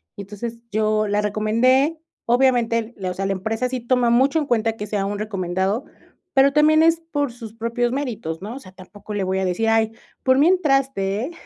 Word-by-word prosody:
Y - - -7
entonces, 215 +4 -7
yo 215 0 +1
la 205 0 +1
recomendé, 230 +9 +2 0.3
obviamente 240 -2 +2
la, 185 -2 -3
o - - -4
sea, 195 +2 -3
la 195 - 0
empresa 220 +6 -2
sí 255 -1 -4
toma 245 0 +2
mucho 265 +6 +3
en 300 - -2
cuenta 225 -3 +1
que 210 0 -5
sea 200 -1 -1
un 205 0 -3
recomendado, 195 +2 -2 0.5
pero, 275 0 +4
también 310 +1 +5
es 330 0 +3
por 285 -4 -1
sus 230 -3 -10
propios 235 +1 -1
méritos, 225 - -4
¿no? 220 +5 -6
O - - -7
sea, 185 - -14
tampoco 200 +3 -11
le 205 -2 -1
voy 190 +1 -1
a 190 - 0
decir: 185 +5 -1
"Ay, 225 0 +2 0.3
por 260 0 +4
mí 300 - +5
entraste, 270 - +1
¿eh?" 325 - -6
225 Hz, 210 wpm, -22 LUFS, 205-260 Hz, 0.5 s, también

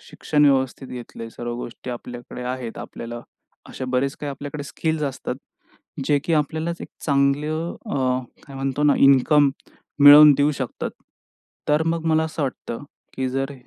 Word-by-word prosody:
शिक्षण 150 -1 0
व्यवस्थित 135 -1 +1
घेतले, 120 -2 -8
सर्व 120 +1 -5
गोष्टी 120 +1 -7
आपल्याकडे 120 0 -8
आहेत, 125 -2 -5
आपल्याला 120 0 -7 0.5
असे - - -6
बरेच 135 +2 0
काही 145 - -5
आपल्याकडे 145 +1 -6
स्किल्स, 160 +2 -2
असतात 140 -3 -3 0.7
जे 145 +1 +3
की 170 - -1
आपल्यालाच 160 +3 -1
एक - - -8 0.2
चांगलं 150 +3 +1
अ, - - -2 0.5
काय 140 - -11
म्हणतो 135 +1 -2
ना, 150 -1 +5
इन्कम 140 +1 +5 0.5
मिळवून 145 +1 +10
देऊ 145 +1 +3
शकतात 130 -4 -4 0.8
तर 150 +1 +3
मग 165 0 -1
मला 160 0 +3
असं 155 -1 -4
वाटतं, 130 -3 -4 0.3
की 130 -1 -1
जर 135 +2 -2
140 Hz, 150 wpm, -23 LUFS, 130-150 Hz, 0.8 s, मिळवून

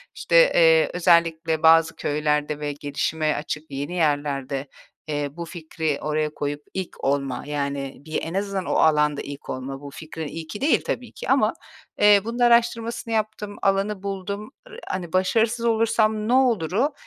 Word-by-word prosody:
işte, - - -1 0.2
eee, - - +5
özellikle 165 -2 +2
bazı 160 0 +5
köylerde 150 0 -1
ve 150 -1 -2
gelişime 150 +2 -1
açık 150 0 -5
yeni 140 +5 -4
yerlerde, 145 -4 -1 0.4
eee, 145 -1 -2
bu 170 +3 -7
fikri 160 -3 -3
oraya 155 0 -1
koyup 145 0 -3
ilk 190 -2 -6
olma, 135 -2 -1
yani, 140 -2 -3
bir 155 - -2
en 165 - -5
azından 195 -1 -2
o - - -1
alanda 150 -2 +3
ilk 140 0 -9
olma, 135 +2 -5
bu 145 - -8
fikrin 160 +1 -7
ilki 165 - -7
değil 295 +3 +3
tabii - - -3
ki - - -8
ama, - - +3 0.5
eee, 205 -1 +7
bunun 235 +2 -4
araştırmasını 235 -1 +2
yaptım, 215 -1 -2
alanı 195 0 0
buldum. 200 +3 -5 0.2
R 470 - -10
hani, 180 -2 -4
"Başarısız 225 +5 +1
olursam 220 -1 +2
ne 240 - +2
olur?"u, 245 - +2
165 Hz, 155 wpm, -23 LUFS, 150-215 Hz, 0.5 s, eee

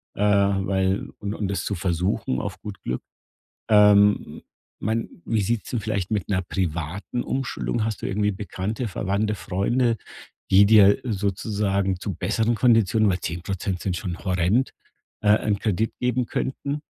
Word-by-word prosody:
äh, - - -5
weil 100 -1 +2
und 100 -1 -3
und 105 - -2
das 100 - -2
zu 100 - -1
versuchen, 85 -6 -1
auf - - -5
gut 105 -3 -8
Glück. 60 - -3 0.7
Ähm, 105 -1 +6
m - - -11 0.4
mein, 110 +2 -1 0.2
wie 110 -2 +1
sieht's 115 +2 -1
denn 120 - 0
vielleicht 100 -4 -2
mit 105 -4 -1
'ner 95 -2 +1
privaten 90 +6 -3
Umschuldung 130 -3 -2
hast 110 -2 -3
du - - -1
irgendwie 105 +1 +1
Bekannte, 105 +4 -4
Verwandte, 100 +2 -1
Freunde, 115 +6 0 0.5
die 100 +2 +7
dir 100 -2 +6
sozusagen 100 -3 -1
zu 100 - -4
besseren 115 +6 0
Konditionen 110 -3 +3
weil 90 -1 0
10% 90 +2 -3
sind 90 -3 -2
schon 90 -1 -5
horrend, 95 +7 +1 0.5
äh, 105 0 +5
'nen 105 -2 +1
Kredit 110 +1 0
geben 125 0 0
könnten 140 +2 -3
100 Hz, 150 wpm, -24 LUFS, 95-110 Hz, 0.7 s, die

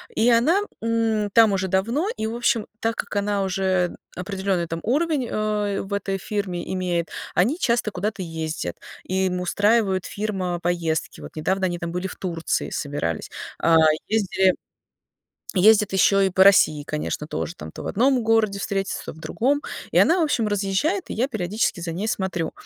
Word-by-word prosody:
И 230 +2 +3
она, 290 - +4 0.2
м, 225 -2 0
там 225 -3 +6
уже 190 0 0
давно, 230 - 0
и, 220 - -2
в 225 - -4
общем, 235 -2 +1
так 225 +1 -1
как - - -5
она 200 -1 0
уже 185 -1 0 0.2
определенный 190 -2 -2
там 165 0 -4
уровень, 285 +1 +1
э, 210 -2 -1
в 195 +1 -6
этой 195 -1 -1
фирме 190 -3 -4
имеет, 175 -3 -1 0.2
они 250 - +2
часто 235 - +1
куда-то 200 +1 -3
ездят, 160 - -4 0.3
и 190 +1 0
им 180 0 -2
устраивают 205 0 +2
фирма 190 -4 -3
поездки. 170 -2 -1
Вот - - -10
недавно 190 +5 0
они 175 -1 -1
там 170 0 -4
были 180 +2 -3
в - - -9
Турции, 170 -3 -2
собирались. 110 - -3 0.3
Э, 165 0 +4 0.3
ездили 190 -3 +2 1.0
ездят 210 +1 +5
еще 195 0 +4
и - - +3
по 190 +1 +4
России, 155 -6 +5
конечно, 150 0 -3
тоже 165 +2 -4
там, - - -9
то - - -8
в - - -7
одном 255 +3 +2
городе 220 -3 +2
встретятся, 195 -1 -2
то - - -5
в 160 - -16
другом. 275 - 0 0.3
И - - -4
она, 350 +3 +5
в - - +3
общем, 230 -7 0
разъезжает, 205 - 0
и - - -4
я 255 +5 0
периодически 205 -3 -1
за 165 -1 -4
ней 200 +6 -3
смотрю. 190 -5 -2
195 Hz, 175 wpm, -23 LUFS, 180-220 Hz, 1.0 s, там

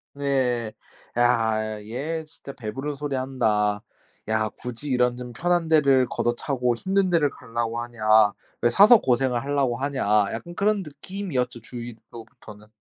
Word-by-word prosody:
네. 130 -5 0 0.5
'야 110 -3 +1
얘 145 +9 -4
진짜 155 -3 -11
배부른 135 +6 -5
소리 145 0 -4
한다. 105 -6 0 0.5
야 110 0 +1
굳이 125 +6 -7
이런 125 -1 +2
좀 125 -1 -8
편한 175 +5 0
데를 140 -5 +4
걷어차고 120 +1 -1
힘든 190 +8 0
데를 160 -5 +2
가려고 115 -1 -4
하냐. 120 -1 -8 0.6
왜 120 - +4
사서 205 - +7
고생을 125 -1 +1
하려고 140 -3 0
하냐.' 140 0 -2 0.3
약간 170 +10 -6
그런 205 0 +1
느낌이었죠 150 -6 -4
주위로부터는. 115 -2 -11
125 Hz, 285 characters per minute, -24 LUFS, 115-145 Hz, 0.6 s, 사서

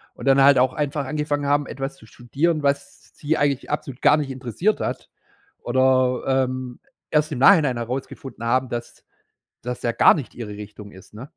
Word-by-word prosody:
und - - -9
dann 135 0 +5
halt 140 -1 +6
auch 130 0 +2
einfach 145 -1 -2
angefangen 145 +1 -2
haben, 145 0 +1
etwas 135 +1 -6
zu - - -17
studieren, 150 +8 -2
was 140 0 -3
sie 155 +2 -1
eigentlich 140 -2 -1
absolut 135 -3 -4
gar 150 - +5
nicht 140 -3 -3
interessiert 130 - -1
hat - - -4 0.5
oder, 130 0 +2 0.2
ähm, 130 -1 -6 0.3
erst 155 0 +1
im 130 - -4
Nachhinein 145 -5 +5
herausgefunden 125 +1 -6
haben, 130 +2 +1
dass 120 -1 -7 0.6
das 125 +1 -5
ja 120 - +1
gar - - +6
nicht 145 -6 -6
ihre 110 -3 -7
Richtung 105 0 -10
ist, 95 +1 -16
ne? 115 +6 -9
135 Hz, 180 wpm, -22 LUFS, 125-145 Hz, 0.6 s, halt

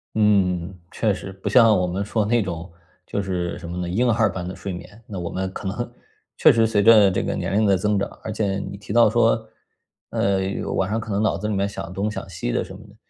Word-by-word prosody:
嗯， 95 -4 +2
确 110 -3 +1
实， 95 - -7
不 95 0 -5
像 115 -5 +6
我 90 - +1
们 95 +3 -2
说 105 +1 0
那 115 +2 +2
种 85 -2 -5 0.3
就 100 - -2
是 90 -2 -3
什 85 - -8
么 90 - -5
呢， 90 -1 -3
婴 120 +7 +1
儿 110 -3 +2
般 90 -1 -5
的 95 - -6
睡 100 -2 -5
眠。 100 +6 -10
那 95 -4 -6
我 85 - -4
们 95 0 -3
可 100 - -5
能 120 +5 -4 0.5
确 - - +7
实 115 -1 +3
随 105 -2 +2
着 105 -3 +7
这 - - 0
个 - - -2
年 - - -3
龄 110 - +3
的 95 -1 +4
增 105 +1 +1
长， 100 - -2
而 110 - -4
且 100 -2 -1
你 100 - -6
提 100 - -9
到 115 -2 +6
说， 115 -1 +2 0.6
呃， 100 -1 +1 0.4
晚 95 +1 0
上 110 +2 0
可 110 -1 -6
能 100 +2 0
脑 110 - +1
子 105 - -3
里 105 - -1
面 100 0 0
想 95 -3 -7
东 100 +3 -1
想 105 - -6
西 85 -8 -3
的 - - 0
什 95 - -10
么 100 - -12
的。 100 - -18
100 Hz, 275 characters per minute, -23 LUFS, 95-110 Hz, 0.6 s, 确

